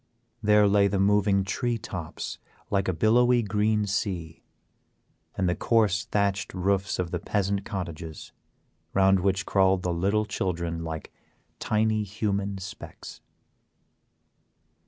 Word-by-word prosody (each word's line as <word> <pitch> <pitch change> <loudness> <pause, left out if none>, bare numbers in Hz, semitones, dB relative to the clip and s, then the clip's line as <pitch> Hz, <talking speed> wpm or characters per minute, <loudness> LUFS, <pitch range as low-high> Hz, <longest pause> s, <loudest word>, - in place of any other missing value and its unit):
There 105 -1 +5
lay 100 0 +4
the 100 0 -1
moving 100 0 +3
tree 120 +5 -1
tops 90 -6 -6 0.3
like 100 -1 +1
a - - +2
billowy 120 +7 +4
green 105 +1 +1
sea, 95 -5 -3 1.0
and 95 - +1
the 90 - +2
coarse 110 -3 +2
thatched 100 -4 -1
roofs 95 +2 0
of 90 -2 -2
the 90 - -2
peasant 100 +2 -1
cottages, 85 -5 -6 0.6
round 95 0 +5
which 95 +2 0
crawled 95 -2 +3
the 90 - 0
little 100 +5 +1
children 85 -5 -3
like 80 -2 -6 0.5
tiny 110 0 +1
human 100 -1 -2
specks. 95 0 -9
100 Hz, 120 wpm, -27 LUFS, 90-105 Hz, 1.0 s, There